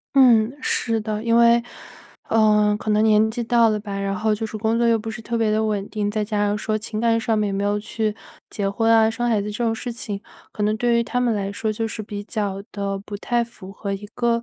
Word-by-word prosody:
嗯， 240 -4 +6
是 225 -3 0
的， 215 0 -3
因 230 0 +2
为， 235 0 +6 0.7
呃， 210 -1 +4
可 - - -5
能 215 +1 +3
年 220 0 +4
纪 240 +1 -3
到 230 -1 +4
了 215 -1 0
吧， 200 -2 -6
然 195 0 -1
后 215 +1 +1
就 210 +1 -3
是 215 - -6
工 220 +2 0
作 235 0 +2
又 230 -1 +4
不 225 +1 -5
是 215 - -7
特 235 +1 -3
别 225 -2 +1
地 215 +1 +1
稳 205 -2 -1
定， 210 -1 -2
再 215 0 -1
加 205 -1 0
上 205 - 0
说 215 0 -1
情 215 0 -5
感 230 0 +2
上 225 -1 0
面 205 -2 0
没 200 - -1
有 205 +1 +1
去 215 0 -2 0.3
结 200 -2 -2
婚 225 +3 +1
啊、 225 -1 +5
生 240 +2 -2
孩 215 -3 +2
子 210 - -4
这 220 +3 -3
种 225 -1 +1
事 240 +2 -5
情， 215 -4 -5 0.3
可 210 - -3
能 210 +1 +2
对 235 +1 +2
于 235 - +2
他 245 - -2
们 245 -2 +2
来 195 -1 -2
说 215 +2 -2
就 225 +1 -2
是 220 - -5
比 205 -1 -6
较 200 -2 -3
地 200 -1 -3
不 205 +1 -8
太 240 +2 0
符 195 -5 -12
合 200 0 -4
一 205 +1 -6
个 235 -1 +1
215 Hz, 280 characters per minute, -22 LUFS, 205-230 Hz, 0.7 s, 嗯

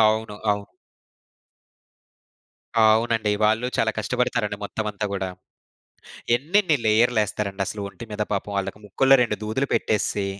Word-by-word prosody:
అవును. 110 -1 +2 0.2
అవు 100 0 -2 2.1
అవునండి. 110 0 +3
వాళ్ళు 110 +3 +2
చాలా 110 - +2
కష్టపడతారండి 110 -2 -1
మొత్తం 110 +1 -4
అంతా 105 +1 -5
గూడా. 95 -1 -2 1.1
ఎన్నెన్ని 165 +4 +2
లేయర్‌లేస్తారండి 105 -3 +1
అసలు 105 - -5
ఒంటి 115 - -10
మీద 105 0 -2
పాపం 100 +1 -2
వాళ్ళకి 100 +1 -3
ముక్కలో 135 +7 +4
రెండు 105 -3 -1
దూదులు 110 +6 -1
పెట్టేసి, 105 -2 0
110 Hz, 115 wpm, -24 LUFS, 105-115 Hz, 2.1 s, ముక్కలో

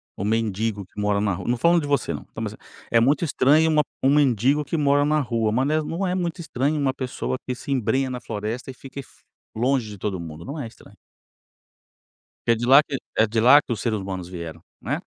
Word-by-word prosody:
o - - -5
mendigo 110 -1 -1
que 105 - -12
mora 105 -1 +1
na 100 -2 +1
rua 90 +3 -6
não 120 0 +1
falando 170 +4 +4
de 145 - -4
você, 140 - 0
não 75 - -6
tá - - -9
mas - - -3
é - - -13 0.3
é 115 - +5
muito 140 +8 +2
estranho 155 +3 +4
uma 150 -1 +4
p - - -42
um 135 +2 +4
mendigo 140 +1 +3
que 160 +3 -3
mora 145 -1 +3
na 155 +1 +2
rua, 115 -4 0
mas 130 +4 +1
não 155 - +1
é - - +2
es - - -2
não 180 +3 -2
é 180 - 0
muito 175 -1 -2
estranho 145 0 -1
uma 135 -2 +1
pessoa 130 0 -3
que 125 - -2
se 135 +3 -7
embrenha 130 +1 +1
na 125 -1 -4
floresta 110 +4 -5
e - - -6
fique 135 +2 -10
f 135 - -13 0.3
longe 125 -1 +1
de 105 - -9
todo 95 -1 -3
mundo, 80 -1 -8
não 145 +3 -6
é 120 - -4
estranho. 115 - -17 1.5
Que 115 - +5
é - - +4
de 120 +2 -3
lá 135 +3 +8
que 140 -3 -4 0.2
é 110 - +5
de 110 +1 0
lá 140 +5 +7
que - - -5
os 110 - -3
seres 110 -3 0
humanos 95 -2 -5
vieram, 85 -3 -8 0.2
né. - - -2
125 Hz, 255 wpm, -23 LUFS, 105-145 Hz, 1.5 s, lá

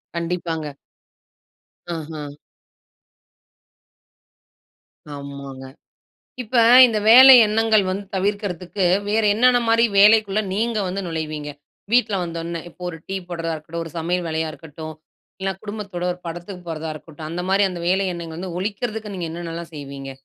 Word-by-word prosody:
கண்டிப்பாங்க. 170 -2 -3 1.3
ஆஹா! 155 -1 -7 2.9
ஆமாங்க. 140 -1 -8 0.8
இப்ப 245 +2 -4 0.3
இந்த 225 -3 -1
வேலை 260 +3 +11
எண்ணங்கள் 215 -1 +2
வந்து 195 +2 -3
தவிர்க்கிறதுக்கு 195 -1 -2 0.2
வேறு 215 +1 +2
என்னென்னமாரி 235 -1 +4
வேலைக்குள்ள 210 0 +5
நீங்க 225 +2 0
வந்து 190 +2 -3
நுழைவீங்க? 155 -3 -4 0.4
வீட்ல 235 -3 +3
வந்தவுடனே 170 0 -5
இப்போ 180 - -17
ஒரு 165 - -9
டீ 195 - -3
போடுறதா 165 -2 -3
இருக்கட்டும், 160 +2 -6
ஒரு 165 - -10
சமையல் 175 +2 -1
வேலையா 160 0 -1
இருக்கட்டும், 155 0 -9 0.5
இல்லன்னா 190 0 -3
குடும்பத்தோட 205 -4 -6
ஒரு 180 - -12
படத்துக்கு 175 +2 -8
போறதா 160 -1 -4
இருக்கட்டும், 155 0 -10
அந்தமாரி 185 +4 0
அந்த 175 -1 -6
வேலை 190 +2 +2
எண்ணங்கள் 165 -1 -7
வந்து, 180 -1 -6
ஒழிக்கிறதுக்கு 210 +2 -4
நீங்க 180 -3 -4
என்னென்னலாம் 170 0 -7
செய்வீங்க? 140 -2 -8
175 Hz, 120 wpm, -21 LUFS, 160-205 Hz, 2.9 s, வேலை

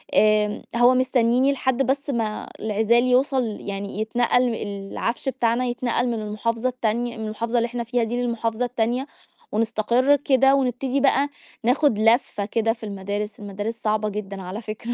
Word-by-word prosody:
آمم، 210 -1 +3
هو 240 +2 +6
مستنيني 255 +1 +3
لحد 260 0 0
بس 280 +2 -1
ما 225 -4 -2
العزال 220 +3 +2
يوصل 260 +1 +3 0.2
يعني 200 +1 -5
يتنقل 240 +1 +1
العفش 205 +6 -3
بتاعنا 245 -1 0
يتنقل 245 0 -1
من 240 - 0
المحافظة 230 +3 -1
التانية 240 -1 -2
من 220 - -4
المحافظة 230 +3 -2
اللي 235 - +2
إحنا 240 0 -4
فيها 240 0 0
دي 240 +2 -2
للمحافظة 235 0 -1
التانية، 245 +3 -1 0.4
ونستقر 230 +5 +2
كده، 270 -1 +3
ونبتدي 260 +1 0
بقى 280 +1 +3 0.3
ناخد 250 -2 +2
لفّة 225 -2 +2
كده 225 +1 0
في 225 -2 -10
المدارس، 205 +2 -4
المدارس 205 +3 -4
صعبة 215 0 +1
جدًا 200 -2 -6
على 185 +5 -6
فكرة. 220 +2 -5
235 Hz, 155 wpm, -23 LUFS, 215-250 Hz, 0.4 s, هو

